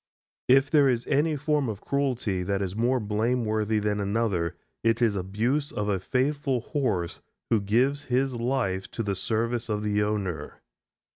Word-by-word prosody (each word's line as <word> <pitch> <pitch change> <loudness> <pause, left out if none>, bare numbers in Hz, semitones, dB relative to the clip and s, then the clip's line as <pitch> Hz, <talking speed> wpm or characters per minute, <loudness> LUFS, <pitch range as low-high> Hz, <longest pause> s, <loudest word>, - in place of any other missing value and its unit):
If 135 +2 +5
there 145 -3 +5
is 120 -2 0
any 150 +2 +2
form 145 -2 0
of 105 -3 -4
cruelty 125 -10 -1
that 100 +2 -1
is 95 0 -4
more 125 +3 +2
blameworthy 110 0 0
than 105 0 0
another, 100 -5 0 0.3
it 115 0 +3
is 115 -4 +2
abuse 115 +10 -1
of 105 0 -2
a 95 -2 +1
faithful 135 - 0
horse 110 - -2 0.3
who 110 -3 +4
gives 130 +8 +1
his 130 +1 +1
life 120 -6 -1
to 115 - -2
the 100 -2 -1
service 115 +3 -1
of 105 -1 -1
the 105 0 +1
owner. 95 -7 -3
115 Hz, 160 wpm, -27 LUFS, 105-130 Hz, 0.3 s, If